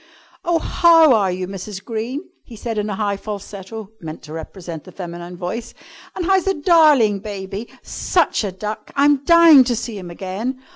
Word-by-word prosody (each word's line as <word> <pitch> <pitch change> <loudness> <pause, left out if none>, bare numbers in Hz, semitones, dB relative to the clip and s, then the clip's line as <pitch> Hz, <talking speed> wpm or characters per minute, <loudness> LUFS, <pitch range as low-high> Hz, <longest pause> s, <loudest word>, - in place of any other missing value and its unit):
"Oh, 345 -2 +2
how 330 -3 +5
are 200 -5 +2
you, 185 0 -4
Mrs. 195 +1 -7
Green?" 235 +7 -4 0.2
he 235 - -12
said 225 0 -4
in 210 +1 -2
a 200 - -2
high 205 -1 -1
falsetto, 205 +1 -8
meant 160 -1 -8
to 155 - -10
represent 165 0 -8
the 185 - -13
feminine 175 -1 -8
voice. 225 +7 -5 0.4
"And 360 - -3
how's 380 0 +2
the 390 0 +1
darling 295 - +4
baby? 200 +1 -6
Such 345 -9 0
a 200 - -2
duck! 210 +3 -6
I'm 285 0 +3
dying 335 -4 +8
to 245 -1 0
see 225 -2 -5
him 180 -2 -8
again! 195 +9 -4
215 Hz, 180 wpm, -20 LUFS, 190-280 Hz, 0.4 s, dying